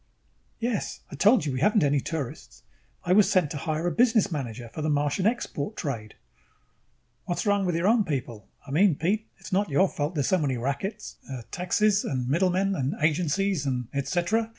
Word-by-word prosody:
"Yes. 235 -2 -3
I - - -6
told 210 -4 +4
you 140 - -1
we 130 - -2
haven't 210 - +3
any 145 0 +3
tourists. 145 -2 -6 0.4
I 175 - +2
was 200 -1 +5
sent 185 -7 +2
to 150 - -3
hire 155 +2 -2
a 175 - +1
business 225 +2 +3
manager 120 -6 -4
for 155 - -5
the 155 - 0
Martian 145 +6 +1
export 220 - -2
trade." 115 - -4 1.1
"What's 175 - -2
wrong 205 -1 +2
with 175 - 0
your 170 +3 +1
own 225 0 +4
people? 125 - -4 0.2
I 140 - -9
mean, 175 +3 +4
Pete, 205 +9 -1
it - - -28
is - - -7
not 200 0 +1
your 170 +7 +4
fault 150 0 -3
there 145 - +1
are - - 0
so 185 +7 +2
many 135 -5 0
rackets 140 - -4
uh, 130 -3 -6
taxes 200 +3 +1
and 130 -3 -2
middlemen 185 +6 +2
and 140 0 -1
agencies 165 +1 +1
and 125 -3 -2
et 140 -1 -2
cetera. 205 +6 0
165 Hz, 200 wpm, -26 LUFS, 140-195 Hz, 1.1 s, was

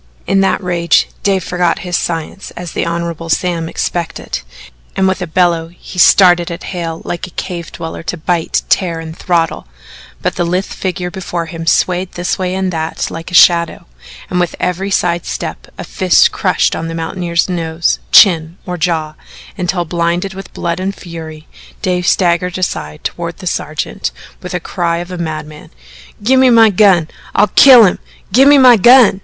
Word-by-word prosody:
In 195 - +2
that 195 0 0
rage 170 -2 +1
Dave 195 -2 0
forgot 180 -1 0
his 175 -1 -2
science 165 +3 -3
as 175 -1 -6
the - - -2
Hon. 170 0 -2 0.2
Sam 165 -1 -1
expected, 170 -1 -4 0.5
and 190 - +2
with 190 0 -1
a 180 - -3
bellow 170 -1 +1
he 180 +2 -10
started 175 -1 +5
at 170 - -7
Hale 165 -2 -5
like 175 - -4
a - - -12
cave 170 -1 -6
dweller 165 - -7
to 170 +2 -4
bite, 170 0 -1
tear, 170 -4 0
and 160 0 -8
throttle, 170 - -1 0.5
but - - -2
the - - +1
lithe 180 +3 -1
figure 180 -1 -4
before 175 -2 -4
him 165 0 -8
swayed 180 +2 +1
this 175 +1 -2
way 185 0 -2
and 190 -1 -2
that 160 0 -3
like 165 +1 -7
a 180 - -4
shadow, 170 -2 +4 0.4
and 180 - -2
with 175 -1 -1
every 180 +2 -2
side 175 -3 0
step - - -5
a - - -6
fist - - +3
crushed - - 0
on 165 - -4
the 165 - -5
mountaineer's 170 +1 -1
nose, 165 -2 -1
chin 170 -3 +5
or 180 -1 -4
jaw, 160 -3 -1 0.4
until, 180 -2 -2
blinded 170 +3 -1
with 190 -1 -10
blood 170 0 -3
and 195 +1 -3
fury, 160 -3 -10 0.4
Dave 180 -1 -1
staggered 180 0 +1
aside 75 - -4
toward - - -5
the - - -11
sergeant - - -3 0.3
with 180 - -7
the 180 - -1
cry 170 -1 -2
of 175 +2 -6
a 180 - -6
madman: 155 -2 -6 0.5
"Gimme 260 +3 +4
my 225 -2 +6
gun! 190 -5 +4 0.3
I'll 210 - +3
kill 250 +1 +8
him! 185 - 0 0.3
Gimme 275 +3 +6
my 250 -3 +7
gun!" 240 -2 +6
175 Hz, 175 wpm, -14 LUFS, 165-185 Hz, 0.5 s, kill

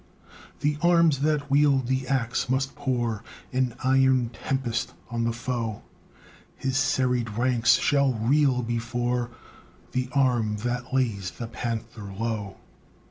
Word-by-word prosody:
The 150 +1 0
arms 170 -4 +4
that 145 -1 0
wield 140 -2 +4
the 130 +1 -1
axe 125 -3 0
must 135 +1 0
pour 120 -6 -2 0.3
An 125 -2 0
iron 130 -2 +3
tempest 120 -2 -2 0.2
on 115 0 -1
the 115 - +1
foe; 115 -2 -3 0.7
His 130 -1 -2
serried 125 -3 +1
ranks 120 -2 +4
shall 140 -2 +3
reel 125 +2 +2
before 120 +1 -1 0.6
The 130 -1 -1
arm 120 -6 +2
that 120 +1 -2
lays 115 -8 0
the 115 - -7
panther 115 -3 -5
low. 105 -1 -3
125 Hz, 125 wpm, -26 LUFS, 115-135 Hz, 0.7 s, arms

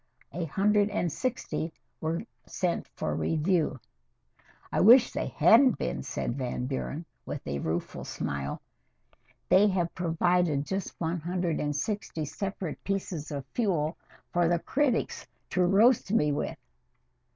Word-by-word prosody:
A 170 +3 -3
hundred 205 +5 +2
and 175 -5 -1
sixty 230 - -2 0.3
were 160 +4 -2 0.2
sent 180 -2 -1
for - - -2
review." 160 -3 +1 0.9
"I - - +1
wish 240 +5 +8
they - - -2
hadn't 250 +2 +5
been," 65 +1 -2
said 120 - -3
Van 125 -1 -2
Buren, 140 +4 -4 0.2
with - - -6
a 70 0 -2
rueful 80 +4 -3
smile. 70 0 -4 0.8
"They 190 +3 +6
have 180 -4 0
provided 170 -3 +1
just 190 +2 -4
one 170 +1 -1
hundred 175 0 -1
and 145 0 -1
sixty 165 -1 -2
separate 180 +2 -5
pieces 190 -6 -3
of 140 -3 -4
fuel 170 -9 0 0.4
for 175 -1 +3
the 175 +1 +3
critics 265 - 0 0.2
to 185 - +2
roast 200 +4 +4
me 150 -9 +3
with. 145 - -2
175 Hz, 135 wpm, -29 LUFS, 150-195 Hz, 0.9 s, wish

